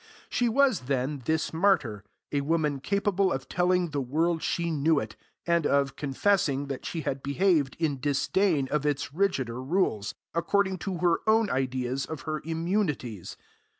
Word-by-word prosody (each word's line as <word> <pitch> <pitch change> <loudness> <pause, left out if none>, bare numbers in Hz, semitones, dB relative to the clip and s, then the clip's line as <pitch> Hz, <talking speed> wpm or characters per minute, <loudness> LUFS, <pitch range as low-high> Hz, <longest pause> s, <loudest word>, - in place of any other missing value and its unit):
She 240 -1 +1
was, 260 - +3
then, 135 +1 -1
this 160 0 0
martyr, 160 - +2 0.3
a 145 - +1
woman 150 -1 0
capable 200 +3 +1
of 135 0 -3
telling 180 0 +1
the 145 -1 -1
world 160 +6 0
she 170 +1 -1
knew 155 +1 +2
it, - - -6 0.3
and 170 -2 +2
of, 140 -1 +1
confessing 145 -1 +1
that 135 - -5
she 165 - -3
had 135 -2 -3
behaved 145 -1 +1
in 150 -5 -1
disdain 145 +2 +1
of 150 -2 +1
its 145 -3 -1
rigider 135 -10 0
rules, 130 - 0 0.2
according 190 +2 +1
to 190 +1 -3
her 170 -1 +3
own 220 -1 +3
ideas 130 0 -1
of 160 -4 -6
her 155 +1 -3
immunities. 165 - -2
155 Hz, 155 wpm, -28 LUFS, 135-180 Hz, 0.3 s, was